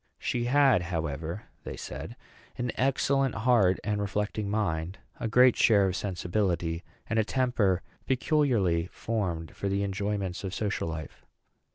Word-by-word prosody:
She 120 Hz, -1 st, -1 dB
had, 135 Hz, -5 st, +4 dB
however, 80 Hz, +1 st, -3 dB, 0.2 s
they -, -, -6 dB
said, -, -, -7 dB, 0.4 s
an 120 Hz, -1 st, -1 dB
excellent 135 Hz, 0 st, +1 dB
heart 110 Hz, -5 st, +3 dB
and 105 Hz, -1 st, -1 dB
reflecting 105 Hz, +1 st, -2 dB
mind, 95 Hz, -4 st, -1 dB, 0.2 s
a 120 Hz, -, -1 dB
great 125 Hz, +2 st, +6 dB
share 105 Hz, -4 st, +5 dB
of 95 Hz, -1 st, 0 dB
sensibility, 90 Hz, -3 st, -1 dB, 0.2 s
and 115 Hz, 0 st, +1 dB
a -, -, +4 dB
temper 110 Hz, -7 st, +1 dB, 0.2 s
peculiarly 120 Hz, -, +2 dB
formed 90 Hz, -9 st, -3 dB
for 100 Hz, -, -2 dB
the 100 Hz, +1 st, 0 dB
enjoyments 100 Hz, -1 st, -2 dB
of 95 Hz, 0 st, -4 dB
social 105 Hz, -5 st, -1 dB
life. 80 Hz, -2 st, -7 dB
100 Hz, 140 wpm, -28 LUFS, 90-120 Hz, 0.4 s, great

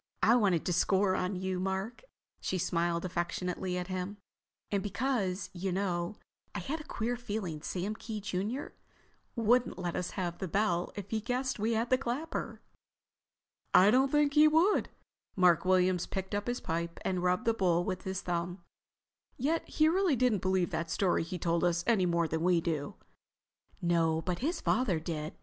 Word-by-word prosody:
I 235 Hz, -, +6 dB
wanted 195 Hz, -9 st, +2 dB
to 180 Hz, -, +1 dB
score 190 Hz, +2 st, +3 dB
on 185 Hz, +1 st, -1 dB
you, 185 Hz, 0 st, -2 dB
Mark—" 190 Hz, +4 st, -3 dB, 0.4 s
she 185 Hz, -, -2 dB
smiled 170 Hz, -1 st, 0 dB
affectionately 180 Hz, +1 st, -2 dB
at 180 Hz, -, -2 dB
him—"and 195 Hz, +1 st, -6 dB
because, 205 Hz, -2 st, -1 dB
you 190 Hz, +1 st, -3 dB
know, 180 Hz, 0 st, -1 dB, 0.4 s
I -, -, -1 dB
had 310 Hz, +3 st, -4 dB
a -, -, -12 dB
queer 235 Hz, +2 st, -2 dB
feeling 205 Hz, -10 st, -4 dB
Sam 185 Hz, +6 st, -3 dB
Kee, 215 Hz, 0 st, -6 dB
junior, 205 Hz, +6 st, -3 dB, 0.6 s
wouldn't 240 Hz, +2 st, +2 dB
let 175 Hz, -2 st, -3 dB
us 180 Hz, -, -2 dB
have 175 Hz, -2 st, -2 dB
the 190 Hz, -, -3 dB
bell 180 Hz, -1 st, 0 dB
if 205 Hz, -1 st, -7 dB
he 220 Hz, -1 st, 0 dB
guessed 255 Hz, +2 st, -2 dB
we 220 Hz, +3 st, +1 dB
had 230 Hz, +2 st, -1 dB
the 255 Hz, -, +4 dB
clapper." 275 Hz, +5 st, -4 dB, 1.1 s
"I 195 Hz, +3 st, +8 dB
don't 265 Hz, +3 st, +3 dB
think 295 Hz, -1 st, +3 dB
he 300 Hz, +1 st, +7 dB
would." 325 Hz, +7 st, +3 dB, 0.5 s
Mark 180 Hz, -2 st, +4 dB
Williams 185 Hz, -1 st, +3 dB
picked 190 Hz, 0 st, -4 dB
up 205 Hz, 0 st, -2 dB
his 245 Hz, +1 st, -2 dB
pipe 170 Hz, +1 st, -3 dB
and 185 Hz, -2 st, 0 dB
rubbed 180 Hz, 0 st, +1 dB
the 230 Hz, -, +3 dB
bowl 175 Hz, -5 st, +2 dB
with 185 Hz, 0 st, -3 dB
his 190 Hz, -1 st, -3 dB
thumb. 175 Hz, 0 st, -3 dB, 0.7 s
"Yet 305 Hz, +6 st, -1 dB
he 310 Hz, -, +1 dB
didn't 320 Hz, -, +4 dB
really 340 Hz, -8 st, +3 dB, 0.2 s
believe 185 Hz, -1 st, +1 dB
that 165 Hz, +1 st, -2 dB
story 180 Hz, +3 st, +1 dB
he 170 Hz, +2 st, -4 dB
told 170 Hz, 0 st, 0 dB
us 175 Hz, -1 st, +2 dB
any 215 Hz, -6 st, +3 dB
more 170 Hz, -1 st, +1 dB
than 160 Hz, +1 st, -2 dB
we 175 Hz, 0 st, +3 dB
do." 155 Hz, -4 st, -3 dB, 0.9 s
"No, 165 Hz, -2 st, +2 dB
but 180 Hz, 0 st, -2 dB
his 325 Hz, +6 st, -1 dB
father 200 Hz, -11 st, +1 dB
did. 155 Hz, -1 st, -5 dB
185 Hz, 175 wpm, -31 LUFS, 175-225 Hz, 1.1 s, I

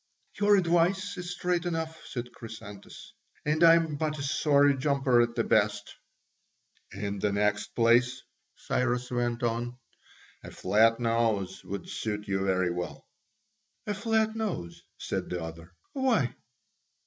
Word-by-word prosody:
"Your 205 Hz, 0 st, +5 dB
advice 185 Hz, +3 st, +1 dB
is 180 Hz, -1 st, -6 dB
straight 180 Hz, -1 st, -1 dB
enough," 160 Hz, -2 st, -3 dB
said 120 Hz, -1 st, -5 dB
Chrysantas; 105 Hz, -3 st, -11 dB, 0.3 s
"and 155 Hz, +2 st, +2 dB
I 165 Hz, 0 st, +9 dB
am 160 Hz, -3 st, 0 dB
but 155 Hz, 0 st, -1 dB
a 140 Hz, -, -4 dB
sorry 145 Hz, -1 st, +3 dB
jumper 135 Hz, -3 st, +2 dB
at 120 Hz, 0 st, 0 dB
the 115 Hz, -, +1 dB
best." 105 Hz, -1 st, +1 dB, 1.0 s
"In 100 Hz, 0 st, -4 dB
the 105 Hz, -, +1 dB
next 105 Hz, +1 st, 0 dB
place," 120 Hz, +2 st, +3 dB, 0.3 s
Cyrus 125 Hz, 0 st, -1 dB
went 120 Hz, -1 st, -1 dB
on, 120 Hz, +1 st, -2 dB, 0.7 s
"a -, -, -8 dB
flat 110 Hz, +5 st, +3 dB
nose 115 Hz, -5 st, 0 dB
would 100 Hz, -1 st, -6 dB
suit 105 Hz, -1 st, -4 dB
you 95 Hz, -1 st, 0 dB
very 95 Hz, -2 st, +1 dB
well." 90 Hz, 0 st, -5 dB, 0.8 s
"A 210 Hz, -, -1 dB
flat 220 Hz, +1 st, 0 dB
nose?" 180 Hz, -, -4 dB, 0.2 s
said -, -, -4 dB
the 90 Hz, -2 st, -3 dB
other, 80 Hz, +1 st, -9 dB, 0.2 s
"why?" 250 Hz, -, +1 dB
120 Hz, 135 wpm, -28 LUFS, 105-165 Hz, 1.0 s, I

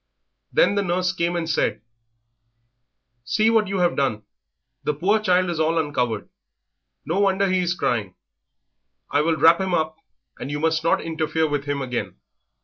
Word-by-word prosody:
Then -, -, +3 dB
the 200 Hz, -, +1 dB
nurse 180 Hz, 0 st, 0 dB
came 170 Hz, -1 st, -1 dB
and 170 Hz, -1 st, -2 dB
said 155 Hz, -, 0 dB, 1.4 s
"See 215 Hz, -, +2 dB
what 220 Hz, -2 st, +3 dB
you 195 Hz, 0 st, -2 dB
have 175 Hz, -1 st, +2 dB
done, 110 Hz, -6 st, -1 dB, 0.6 s
the 150 Hz, 0 st, -1 dB
poor 200 Hz, +8 st, +2 dB
child 185 Hz, -3 st, +2 dB
is 165 Hz, -, -4 dB
all 160 Hz, +1 st, +1 dB
uncovered; 125 Hz, -8 st, -1 dB, 0.8 s
no 170 Hz, +5 st, -1 dB
wonder 195 Hz, 0 st, +2 dB
he 185 Hz, 0 st, +1 dB
is 175 Hz, -1 st, 0 dB
crying. 105 Hz, -, -1 dB, 1.0 s
I 145 Hz, -, +3 dB
will 160 Hz, +1 st, +1 dB
wrap 165 Hz, +4 st, +5 dB
him 190 Hz, -2 st, 0 dB
up, 160 Hz, -1 st, -1 dB, 0.4 s
and 130 Hz, -, -5 dB
you 145 Hz, 0 st, -3 dB
must 160 Hz, 0 st, +1 dB
not 165 Hz, -, +2 dB
interfere 160 Hz, 0 st, -1 dB
with 145 Hz, -1 st, -2 dB
him 145 Hz, -1 st, -2 dB
again." 125 Hz, -2 st, -4 dB
165 Hz, 165 wpm, -23 LUFS, 145-185 Hz, 1.4 s, wrap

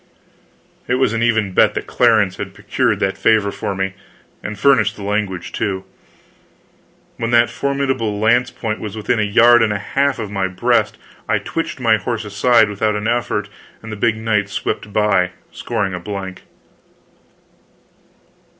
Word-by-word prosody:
It 125 Hz, -, +1 dB
was 130 Hz, -3 st, +1 dB
an 115 Hz, -, -1 dB
even 110 Hz, -4 st, +1 dB
bet -, -, +3 dB
that -, -, -3 dB
Clarence 110 Hz, -6 st, +2 dB
had -, -, -6 dB
procured -, -, 0 dB
that 95 Hz, 0 st, -1 dB
favor 100 Hz, 0 st, +3 dB
for 100 Hz, -, -4 dB
me 95 Hz, 0 st, -2 dB, 0.5 s
and 105 Hz, 0 st, -6 dB
furnished 110 Hz, -3 st, +3 dB
the 100 Hz, -, -9 dB
language, 100 Hz, -3 st, -2 dB
too. 95 Hz, -3 st, -2 dB, 1.3 s
When 115 Hz, -, -2 dB
that 120 Hz, 0 st, +4 dB
formidable 135 Hz, -6 st, -1 dB
lance 115 Hz, +4 st, +2 dB
point 110 Hz, -2 st, -4 dB
was 105 Hz, 0 st, -6 dB
within 110 Hz, +2 st, 0 dB
a -, -, +2 dB
yard 120 Hz, +3 st, +5 dB
and 110 Hz, -2 st, +2 dB
a 105 Hz, -, 0 dB
half 135 Hz, +7 st, 0 dB
of 110 Hz, -4 st, -5 dB
my 95 Hz, -2 st, -1 dB
breast 95 Hz, -1 st, 0 dB, 0.3 s
I -, -, +3 dB
twitched 165 Hz, -4 st, -4 dB
my 115 Hz, -3 st, +3 dB
horse 110 Hz, +2 st, -4 dB
aside 110 Hz, +3 st, +3 dB
without 105 Hz, +1 st, -1 dB
an 105 Hz, +1 st, -2 dB
effort, 115 Hz, -3 st, -1 dB, 0.4 s
and 110 Hz, -, -8 dB
the -, -, -4 dB
big 110 Hz, +1 st, +1 dB
knight 110 Hz, -2 st, 0 dB
swept 105 Hz, +1 st, -3 dB
by, 100 Hz, -4 st, +2 dB, 0.2 s
scoring 95 Hz, -2 st, -3 dB
a 90 Hz, -, -4 dB
blank. 95 Hz, 0 st, -6 dB
105 Hz, 160 wpm, -18 LUFS, 100-115 Hz, 1.3 s, yard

